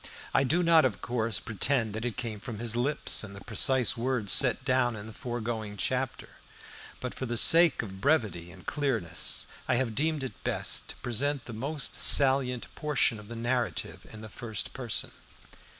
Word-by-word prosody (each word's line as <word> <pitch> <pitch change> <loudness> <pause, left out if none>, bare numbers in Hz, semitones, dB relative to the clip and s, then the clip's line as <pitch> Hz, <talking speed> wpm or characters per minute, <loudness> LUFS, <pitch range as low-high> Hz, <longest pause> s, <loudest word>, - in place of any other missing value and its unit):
I - - +4
do 165 +7 +1
not, 165 -1 +6
of 130 -6 0
course, 115 -4 -1
pretend 115 0 -1
that 110 +2 -4
it 120 - -3
came 115 -4 -4
from 110 +1 -6
his 115 +1 -1
lips 130 +1 +1
in 100 -2 -7
the 100 - -10
precise 125 +2 +3
words 120 -4 0
set 125 0 +4
down 130 -3 +2
in 105 -1 -7
the 110 - -10
foregoing 115 -3 -4
chapter, 130 +4 -2 0.7
but 125 - -5
for 130 - -5
the 120 0 -2
sake 165 +1 +6
of 95 -3 -9
brevity 105 - +1
and 90 0 -14
clearness, 115 - -1 0.2
I - - +2
have 120 -2 0
deemed 155 +3 0
it 130 - -8
best - - -2
to - - -6
present 135 +4 -2
the 120 - -8
most 140 +6 -2
salient 130 -3 +4
portion 145 -7 0
of 105 - -12
the 115 - -7
narrative 120 +1 -2
in 110 - -9
the 110 - -8
first 110 -2 -6
person. 125 -4 -3
120 Hz, 180 wpm, -29 LUFS, 110-135 Hz, 0.7 s, not